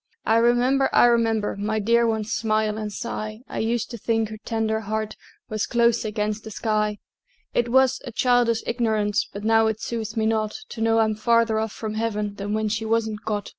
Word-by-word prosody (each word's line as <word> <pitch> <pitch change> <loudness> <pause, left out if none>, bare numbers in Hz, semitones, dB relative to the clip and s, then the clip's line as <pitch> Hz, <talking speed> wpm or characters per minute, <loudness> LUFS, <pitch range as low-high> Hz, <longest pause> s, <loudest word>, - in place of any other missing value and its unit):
I 225 - +3
remember, 245 +3 +3
I - - +6
remember, 225 -3 +2
My 210 +2 -2
dear 230 +2 +3
one's 220 -1 -1
smile 215 -1 0
and 210 -1 -4
sigh; 215 -1 -5
I - - -5
used 230 +2 -1
to 235 - -7
think 225 0 0
her 215 - -7
tender 220 -1 -1
heart 215 0 -3 0.3
Was 215 -1 -2
close 235 -1 +2
against 210 0 -2
the 220 - -8
sky. 210 -1 -1 0.6
It 240 0 +1
was 265 +1 +3
a 245 - -7
childish 240 -1 +2
ignorance, 215 -3 0
But 200 - -7
now 225 0 +4
it 220 -1 -1
soothes 220 -1 -4
me 220 - +1
not 220 -1 0
To 225 - -7
know 225 0 +3
I'm 220 -1 +3
farther 230 0 +2
off 220 -1 -2
from 215 -1 -5
Heaven 210 -2 -2
Then 205 +1 -3
when 215 0 0
she 215 +1 -2
wasn't 220 -1 -1
got. 210 -2 -2
220 Hz, 200 wpm, -24 LUFS, 215-230 Hz, 0.6 s, I